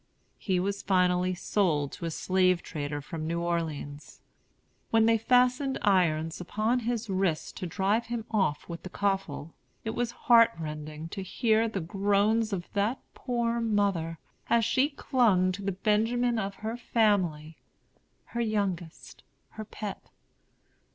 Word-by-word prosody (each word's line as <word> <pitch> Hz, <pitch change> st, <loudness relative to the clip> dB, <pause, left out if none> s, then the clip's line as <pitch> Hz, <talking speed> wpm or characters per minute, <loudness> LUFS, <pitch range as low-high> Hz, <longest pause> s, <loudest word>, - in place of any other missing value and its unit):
He 185 Hz, -3 st, 0 dB
was 200 Hz, +2 st, -2 dB
finally 180 Hz, -1 st, +2 dB
sold 165 Hz, -7 st, 0 dB
to -, -, -7 dB
a -, -, -1 dB
slave 185 Hz, +1 st, +1 dB
trader 145 Hz, -1 st, -4 dB
from 155 Hz, +1 st, -5 dB
New 170 Hz, +1 st, -1 dB
Orleans. 160 Hz, -4 st, -4 dB, 0.7 s
When 225 Hz, -1 st, +4 dB
they 225 Hz, 0 st, +4 dB
fastened 250 Hz, +3 st, +3 dB
irons 165 Hz, -5 st, +2 dB
upon 215 Hz, +7 st, 0 dB
his 235 Hz, -1 st, -2 dB
wrists 190 Hz, -5 st, 0 dB
to 185 Hz, -, -6 dB
drive 200 Hz, +7 st, 0 dB
him 235 Hz, -1 st, -4 dB
off 190 Hz, -9 st, 0 dB
with 170 Hz, -1 st, -7 dB
the 185 Hz, -, -8 dB
coffle, 195 Hz, -6 st, -2 dB, 0.3 s
it 220 Hz, -, -2 dB
was 240 Hz, +1 st, -1 dB
heart 235 Hz, -1 st, +5 dB
rending 155 Hz, 0 st, -6 dB
to 195 Hz, -, -5 dB
hear 220 Hz, +4 st, +1 dB
the 205 Hz, -4 st, -3 dB
groans 205 Hz, +5 st, +1 dB
of 180 Hz, -3 st, -3 dB
that 205 Hz, +6 st, 0 dB
poor 235 Hz, -2 st, -1 dB
mother, 200 Hz, -7 st, 0 dB, 0.3 s
as 230 Hz, -1 st, +4 dB
she 265 Hz, +4 st, +2 dB
clung 225 Hz, -10 st, +2 dB
to 190 Hz, +2 st, -6 dB
the 200 Hz, 0 st, -1 dB
Benjamin 225 Hz, +5 st, +1 dB
of 195 Hz, -1 st, -3 dB
her 225 Hz, +2 st, -2 dB
family, 185 Hz, -10 st, +1 dB, 0.7 s
her 235 Hz, -, -1 dB
youngest, 195 Hz, -7 st, -3 dB, 0.3 s
her 215 Hz, -, -8 dB
pet. 210 Hz, -1 st, -7 dB
195 Hz, 145 wpm, -28 LUFS, 170-225 Hz, 0.7 s, heart